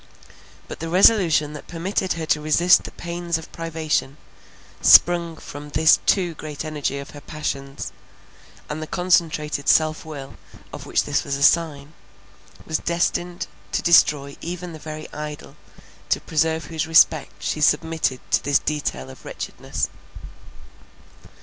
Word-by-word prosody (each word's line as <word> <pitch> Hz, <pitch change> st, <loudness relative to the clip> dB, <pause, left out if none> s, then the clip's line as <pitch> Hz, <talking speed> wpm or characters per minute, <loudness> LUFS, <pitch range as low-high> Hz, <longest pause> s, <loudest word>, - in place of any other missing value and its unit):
But -, -, -8 dB
the 165 Hz, +1 st, -5 dB
resolution 175 Hz, -5 st, +4 dB
that 150 Hz, -, -10 dB
permitted 185 Hz, +3 st, -2 dB
her 165 Hz, -1 st, -4 dB
to 150 Hz, -1 st, +1 dB
resist 165 Hz, +4 st, +4 dB
the -, -, -7 dB
pains 170 Hz, -1 st, -3 dB
of 160 Hz, -, -11 dB
privation, 160 Hz, -4 st, -2 dB, 0.6 s
sprung 170 Hz, -2 st, +6 dB
from 145 Hz, 0 st, -9 dB
the 155 Hz, +2 st, +5 dB
too 180 Hz, -4 st, +2 dB
great 150 Hz, -1 st, -7 dB
energy 150 Hz, -3 st, -3 dB
of 140 Hz, 0 st, -8 dB
her 145 Hz, -, -11 dB
passions; 140 Hz, -2 st, -5 dB, 0.8 s
and 150 Hz, +1 st, -5 dB
the 155 Hz, -, -5 dB
concentrated 160 Hz, -5 st, 0 dB
self 155 Hz, -1 st, +3 dB
will 145 Hz, -4 st, -9 dB, 0.4 s
of -, -, -8 dB
which -, -, +1 dB
this -, -, -1 dB
was 140 Hz, -, -2 dB
a 140 Hz, -, -2 dB
sign, 155 Hz, -2 st, +2 dB, 0.7 s
was 160 Hz, -, -1 dB
destined 175 Hz, +1 st, -1 dB, 0.3 s
to -, -, 0 dB
destroy 145 Hz, -4 st, +4 dB
even 175 Hz, 0 st, -6 dB
the 160 Hz, -, -9 dB
very 155 Hz, 0 st, -7 dB
idol, 150 Hz, 0 st, -7 dB, 0.5 s
to -, -, +2 dB
preserve 160 Hz, 0 st, 0 dB
whose 160 Hz, -2 st, -3 dB
respect 160 Hz, -2 st, +4 dB
she 155 Hz, -, -2 dB
submitted 150 Hz, -3 st, +1 dB
to -, -, +2 dB
this 145 Hz, 0 st, +3 dB
detail 145 Hz, -, -3 dB
of -, -, -15 dB
wretchedness. -, -, -4 dB
155 Hz, 145 wpm, -22 LUFS, 150-170 Hz, 0.8 s, sprung